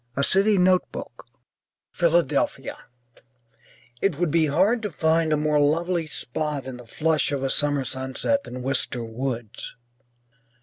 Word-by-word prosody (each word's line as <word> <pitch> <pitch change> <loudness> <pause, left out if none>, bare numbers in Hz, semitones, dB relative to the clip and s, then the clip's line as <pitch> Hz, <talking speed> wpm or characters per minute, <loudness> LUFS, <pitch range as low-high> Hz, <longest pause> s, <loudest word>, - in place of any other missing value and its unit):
A 140 - 0
CITY 200 +6 +4
NOTEBOOK 185 0 0 0.6
(Philadelphia) 170 -4 +1 1.3
It 185 -7 +1
would 175 -2 0
be 160 -1 +3
hard 195 +11 +2
to 210 - -3
find 160 +1 +1
a 155 - +3
more 150 0 +2
lovely 165 +3 +1
spot 150 0 -3
in 130 -2 -7
the 125 -1 -13
flush 155 +5 +1
of 140 -2 -2
a 135 - 0
summer 145 -2 +2
sunset 130 - -1
than 125 0 -7
Wister 130 -2 -1
Woods. 115 -1 -5
150 Hz, 135 wpm, -24 LUFS, 130-170 Hz, 1.3 s, CITY